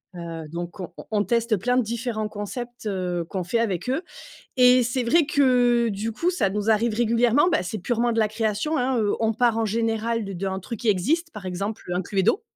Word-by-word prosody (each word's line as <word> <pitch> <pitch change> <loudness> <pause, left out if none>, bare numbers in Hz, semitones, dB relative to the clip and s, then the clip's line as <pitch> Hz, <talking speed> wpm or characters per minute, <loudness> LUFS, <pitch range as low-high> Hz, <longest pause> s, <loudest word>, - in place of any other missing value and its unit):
Heu, 165 -2 -6
donc 175 +2 -6
on 180 - -6 0.2
on 210 -1 +2
teste 235 -1 +1
plein 245 +6 +1
de 255 - +3
différents 225 -1 -3
concepts, 230 +3 -6
heu, 180 -3 -2
qu'on 190 -2 -3
fait 205 +7 0
avec 210 0 -1
eux 270 - 0 0.6
et 250 0 +7
c'est 245 +2 -1
vrai 310 +8 +4
que 245 -4 +3
du 215 +2 -3
coup, 345 +10 0
ça 225 - 0
nous 210 +2 -2
arrive 225 0 +2
régulièrement. 240 +6 +3
Bah 325 - +1
c'est 195 +4 -4
purement 235 +5 0
de 230 - -1
la 215 -1 +3
création 220 +7 -1
hein, 255 -2 +1
heu, 210 -2 +1
on 225 0 +2
part 230 0 +2
en 225 - +1
général 225 +1 -1
d'un 190 +1 -2
truc 200 +3 -7
qui 235 - -1
existe, 255 - +1
par 210 -3 -8
exemple, 195 +4 -4
heu, 175 - -1
un 180 - 0
Cluedo. 195 - +1
225 Hz, 215 wpm, -24 LUFS, 200-245 Hz, 0.6 s, et